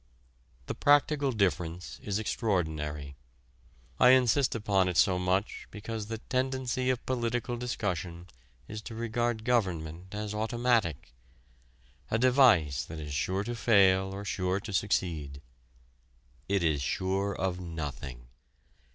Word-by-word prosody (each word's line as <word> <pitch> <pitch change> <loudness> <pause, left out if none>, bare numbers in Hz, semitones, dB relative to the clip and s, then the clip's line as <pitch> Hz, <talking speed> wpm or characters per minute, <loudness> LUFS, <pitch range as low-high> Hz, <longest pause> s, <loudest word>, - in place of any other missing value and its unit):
The - - -3
practical 145 -1 +3
difference 90 - -1
is 100 -1 -2
extraordinary. 80 - -2 0.8
I 125 - +7
insist 130 +1 +2
upon 100 -4 +2
it 90 - -2
so 90 -2 +4
much 95 +3 -1
because 110 0 -6
the 115 0 -4
tendency 130 +1 -1
of 130 -2 -1
political 120 -1 -1
discussion 90 -8 -3 0.4
is 105 0 -6
to 115 +1 -8
regard 115 0 -1
government 95 -6 -1
as 105 0 -4
automatic: 110 - 0 1.0
a 110 - +1
device 120 - +4
that 80 0 -8
is 75 -2 -6
sure 95 +8 -1
to 120 +3 -4
fail 95 -5 +4
or 100 +1 -6
sure 95 -1 -1
to 105 -2 -7
succeed. 80 -8 -1 1.1
It 100 -2 +2
is 75 -4 +1
sure 95 +7 -1
of 95 -1 -2
nothing. 75 -7 -6
100 Hz, 125 wpm, -29 LUFS, 85-115 Hz, 1.1 s, I